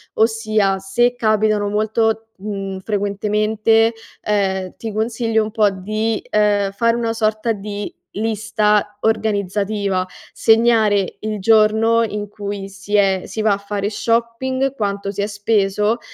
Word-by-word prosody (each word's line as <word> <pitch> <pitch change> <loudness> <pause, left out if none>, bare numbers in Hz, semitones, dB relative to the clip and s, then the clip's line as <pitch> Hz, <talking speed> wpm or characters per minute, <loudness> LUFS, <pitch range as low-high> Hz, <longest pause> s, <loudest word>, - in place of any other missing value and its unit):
ossia 215 -3 +1
se 240 +6 +1
capitano 215 -2 +1
molto, 220 +1 0
mhmm, 195 -1 -5
frequentemente, 215 +2 +1 0.3
ehm, 190 -3 -1
ti 225 - -6
consiglio 225 +1 0
un 215 - -5
po' 215 -2 +3
di, 215 +3 -2
ehm, 205 -2 +2
fare 230 +3 +1
una 230 -1 -1
sorta 220 0 0
di 205 0 -6 0.2
lista 210 -1 0
organizzativa: 205 -3 0 0.3
segnare 220 -4 +3
il 215 -1 -4
giorno 220 +2 +4
in 210 -2 -3
cui 200 -1 -6
si 200 +1 -5
è 195 -2 +3
si 220 - -4
va 215 -1 +3
a - - -1
fare 200 0 -3
shopping, 235 +4 0
quanto 200 -3 -2
si 205 - -4
è 200 - 0
speso 210 +1 +1
215 Hz, 130 wpm, -19 LUFS, 200-225 Hz, 0.3 s, giorno